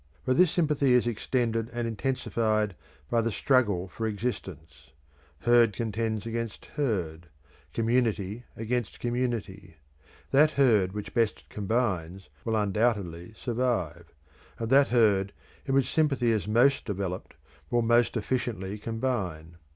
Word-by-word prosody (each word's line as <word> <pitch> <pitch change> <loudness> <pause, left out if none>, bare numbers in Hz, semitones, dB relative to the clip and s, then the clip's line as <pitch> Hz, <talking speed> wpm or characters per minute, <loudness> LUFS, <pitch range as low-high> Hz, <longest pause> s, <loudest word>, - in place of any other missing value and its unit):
But 130 - +2
this 180 +4 +5
sympathy 150 -6 +2
is 125 -1 +4
extended 115 0 -1
and 120 0 -2
intensified 110 -3 0 0.4
by 115 - +3
the 115 0 -1
struggle 105 -7 +2
for 110 +4 -4
existence; 85 - -5 0.5
herd 120 -2 +5
contends 110 -1 -2
against 115 -1 -4
herd, 90 - -2 0.4
community 115 -1 0
against 115 0 -3
community; 115 -7 -3 0.6
that 150 +3 +6
herd 110 -9 +3
which 105 -1 -6
best 115 -3 0
combines 95 -5 -2
will 115 - -1
undoubtedly 105 -3 0
survive; 110 -10 -2 0.5
and 115 +1 -4
that 140 +1 +6
herd 105 -5 +3 0.3
in 135 - +1
which 135 - +2
sympathy 135 -7 +2
is 110 -2 -1
most 125 +6 +3
developed 95 -4 -4 0.3
will 120 -1 +2
most 120 +1 +3
efficiently 105 -4 -2
combine. 100 -9 -3
115 Hz, 120 wpm, -28 LUFS, 100-120 Hz, 0.6 s, that